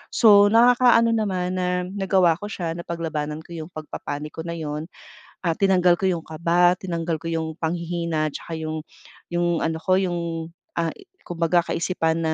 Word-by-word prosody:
So, 205 -3 +7
nakaka 240 +3 +5
ano 230 - +3
naman 185 -5 -1
na 180 0 -1
nagawa 190 -4 +2
ko 205 - -7
siya, 175 -5 -4
napaglabanan 160 -3 -4
ko 170 +1 -10
'yong 160 +2 -7
pagpa-panic 150 -1 -6
ko - - -3
na 170 - -4
'yon, 155 -1 -4 0.6
ah, 165 -3 0
tinanggal 180 -3 +4
ko 190 - -2
'yong 175 -3 +1
kaba, 170 +3 +2
tinanggal 170 -3 -3
ko 150 - -16
'yong 160 -1 -3
panghihina 170 -1 -1
tsaka 165 - -8
'yong 155 0 -4 0.5
'yong 175 -1 +1
ano 160 0 -1
ko, 185 +2 +3
'yong, 180 -2 0 0.6
ah, 165 -1 0 0.3
kumbaga 170 0 +1
kaisipan 165 -2 0
na 160 -1 0
170 Hz, 165 wpm, -23 LUFS, 160-185 Hz, 0.6 s, So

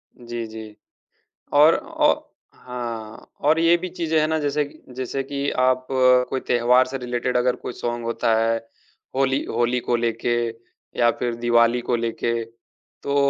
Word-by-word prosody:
जी, 120 -1 -6
जी। 110 -1 -9 0.8
और 150 +3 +7
औ - - +2 0.5
हाँ, 115 -3 -7
और 155 +3 +3
ये 165 +1 +5
भी 180 +1 -5
चीज़ें 165 -3 -1
हैं 155 - +2
ना, 160 0 +1
जैसे 145 0 0
कि 145 - -14
जैसे 130 +1 -3
कि 140 +1 -3
आप 130 0 +2
कोई 130 0 +3
त्योहार 125 +2 +4
से 135 +1 -5
रिलेटेड 125 0 -2
अगर 125 0 +2
कोई - - -6
सॉन्ग 120 0 -4
होता 115 0 +1
है, 115 0 +2 0.6
होली 135 0 +1
होली 120 +1 0
को 120 - 0
लेके 115 0 0 0.7
या 120 0 +5
फिर 120 -1 -1
दिवाली 120 0 +3
को 120 0 0
लेके, 115 0 -2 0.7
तो 140 - -2
125 Hz, 160 wpm, -23 LUFS, 120-135 Hz, 0.8 s, और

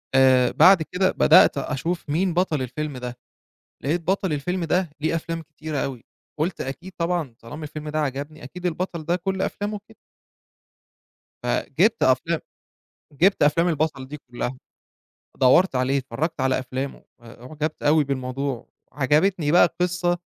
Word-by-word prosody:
آآ 130 -2 +5
بعد 190 -3 +6
كده 185 +3 0
بدأت - - +6
أشوف 150 +4 -3
مين 175 +4 +1
بطل 170 -5 +1
الفيلم 140 +3 -4
ده؟ 125 -1 -6 0.7
لقيت 160 +6 +1
بطل 190 0 0
الفيلم 175 +5 -2
ده 175 +1 0
ليه 160 +2 0
أفلام 165 0 -3
كتيرة 155 -1 -6
أوي، 130 -4 -4 0.4
قُلت 170 +3 -1
أكيد 170 +8 -6
طبعًا 170 -7 -1
طالما 150 +7 -9
الفيلم 150 0 -7
ده 155 +1 -2
عجبني، 145 +2 -4
أكيد 180 +7 -6
البطل 170 -1 -3
ده 170 +3 +1
كل 190 +1 -2
أفلامه 205 +1 -3
كدة. 220 - -18 1.5
فجبت 225 +1 +1
أفلام 130 +6 +2 0.7
جبت 180 +4 +3
أفلام 165 +4 +3
البطل 155 -5 -1
دي 150 +2 -7
كلها، 120 +1 -3 0.8
دوّرت 135 +6 +5
عليه، 130 +2 +1
اتفرجت 135 +4 -3
على 130 0 +2
أفلامه 130 +2 -5 0.2
آآ، 115 0 -14
أعجبت 155 +3 -4
أوي 150 +1 +4
بالموضوع، 135 -1 -3 0.2
عجبتني 150 +3 +2
بقى 175 - +7
القصة 175 0 0
155 Hz, 145 wpm, -23 LUFS, 135-175 Hz, 1.5 s, بقى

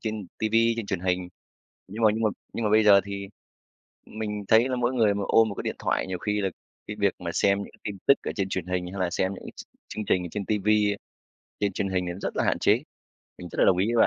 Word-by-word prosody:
trên 110 -3 -4
TV, 110 0 -1 0.2
trên 115 -3 -4
truyền 95 -4 -2
hình. 90 -1 -1 0.6
Nhưng 110 +4 -6
mà - - +8
nhưng 115 - -2
mà 110 - +3 0.2
nhưng 115 - -2
mà 105 - +1
bây 110 0 +5
giờ 100 -1 +8
thì 100 -1 -6 0.8
mình 105 -1 -5
thấy 115 +3 +5
là 125 - 0
mỗi 125 +1 +1
người 110 -5 +3
mà 100 - -2
ôm 115 0 +5
một - - -5
cái - - -5
điện - - -3
thoại, - - 0
nhiều 95 -1 -3
khi 105 +2 -1
là 95 - +1 0.4
cái 105 - -5
việc 100 -1 +2
mà 85 - -3
xem 100 0 +3
những - - -14
tin 105 -2 -4
tức 140 - +8
ở - - -3
trên 95 -2 -1
truyền 95 -2 -3
hình 90 -1 -2
hay 100 - -5
là 90 -1 +1
xem 95 +2 0
những - - -11
cái - - -8
ch - - -8 0.2
chương 110 - -5
trình 90 - +2
ở 90 - -5
trên 105 -2 -3
TV 105 -2 -1
ấy, 105 -1 +3 0.6
trên 100 -1 +1
truyền 100 - -2
hình 95 -1 0
thì 85 - -2
nó 90 - -9
rất - - -3
là - - +1
hạn - - +1
chế. - - +3 0.6
Mình 90 - -8
rất - - -7
là - - +5
đồng 90 - +4
ý 95 - +2
với 115 - +6
100 Hz, 280 wpm, -26 LUFS, 95-110 Hz, 0.8 s, mà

